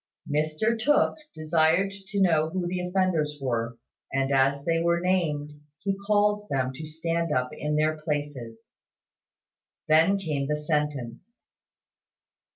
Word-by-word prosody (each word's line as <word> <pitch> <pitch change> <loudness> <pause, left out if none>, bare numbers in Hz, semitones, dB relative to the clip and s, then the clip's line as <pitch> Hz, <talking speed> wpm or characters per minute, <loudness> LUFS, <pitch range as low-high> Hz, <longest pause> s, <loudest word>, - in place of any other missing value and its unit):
Mr 155 +10 0
Tooke 290 +6 +3 0.2
desired 160 +4 +2 0.2
to 200 0 -2
know 160 -4 +3
who 180 +1 -2
the 180 +1 -2
offenders 180 -5 0
were; 115 -3 -2 0.3
and 135 +1 0
as 135 +1 +2
they 165 -1 +2
were 170 +1 +2
named, 160 -5 0 0.2
he 195 +5 -2
called 210 0 +2
to 140 - -2
them 130 -1 0
to 155 +4 -7
stand 165 +1 -2
up 125 -3 0
in 150 0 -2
their 155 +1 +2
places. 145 -7 -5 1.1
Then 160 +6 +5
came 150 -7 -2
the 150 - 0
sentence. 150 - -3
155 Hz, 135 wpm, -26 LUFS, 145-180 Hz, 1.1 s, Then